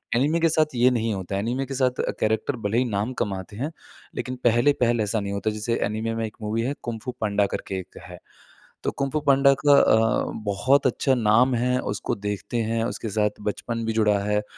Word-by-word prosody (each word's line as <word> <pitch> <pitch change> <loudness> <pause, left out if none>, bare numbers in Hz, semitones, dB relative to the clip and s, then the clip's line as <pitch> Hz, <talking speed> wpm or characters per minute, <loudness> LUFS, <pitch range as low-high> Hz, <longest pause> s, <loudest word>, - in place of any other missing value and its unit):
Anime 145 +7 +2
के 165 0 +3
साथ 155 -3 +1
ये 120 +1 +5
नहीं 115 -2 0
होता 95 0 -4
है। 100 - 0
एनीमे 125 +5 -2
के 135 - -6
साथ 125 -1 +1 0.2
कैरेक्टर 110 +5 0
भले 105 +3 +1
ही 125 - +4
नाम 105 +2 -2
कमाते 100 -1 -4
हैं। 140 +7 -3 0.4
लेकिन 130 0 -4
पहले-पहले 120 -1 +3
ऐसा 105 +2 -1
नहीं 100 -1 -4
होता, 100 +2 -1
जैसे 110 +2 -2
एनीमे 110 +2 -2
में 115 0 -1
एक 110 - -9
मूवी 110 +2 -1
है 135 +4 -1
कुंग 115 -2 -4
फू 125 - -3
पांडा 105 -1 +2
करके 95 - -4
एक 90 - -11
है। - - -10 0.7
तो - - +1
कुंग 140 -1 -3
फू 155 - 0
पांडा 140 0 +6
का 145 - +6
अ, 110 0 +3 0.2
बहुत 115 +8 +2
अच्छा 130 +2 +2
नाम 120 +2 +3
है। 125 +2 +1 0.2
उसको - - -2
देखते 105 +2 -4
हैं। 115 0 0
उसके 115 -1 -4
साथ 105 0 -1
बचपन 115 +2 -3
भी 115 - 0
जुड़ा 105 -2 +2
है। 105 0 +1
115 Hz, 215 wpm, -24 LUFS, 105-125 Hz, 0.7 s, पांडा